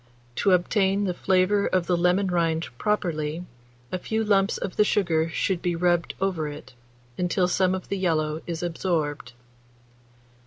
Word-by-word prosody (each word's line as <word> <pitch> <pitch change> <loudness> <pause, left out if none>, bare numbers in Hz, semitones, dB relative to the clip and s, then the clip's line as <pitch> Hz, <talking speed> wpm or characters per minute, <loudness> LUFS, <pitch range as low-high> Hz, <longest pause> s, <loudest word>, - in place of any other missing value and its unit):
To 200 - +2
obtain 195 +2 +2
the 185 -3 0
flavour 190 +3 +2
of 185 -2 +1
the 180 - +1
lemon 180 +3 +2
rind 165 -2 0
properly, 170 -5 -1 0.5
a 185 - -2
few 220 +4 -1
lumps 200 -2 +2
of 190 - -5
the 210 - +5
sugar 165 -6 +1
should 175 +2 -1
be 175 -1 0
rubbed 175 0 +1
over 185 -5 -1
it, 145 -2 -9 0.5
until 180 +1 +1
some 185 +1 +2
of 185 - -7
the 200 - -1
yellow 155 -3 0
is 170 0 -4
absorbed. 160 -7 -2
180 Hz, 155 wpm, -25 LUFS, 165-195 Hz, 0.5 s, the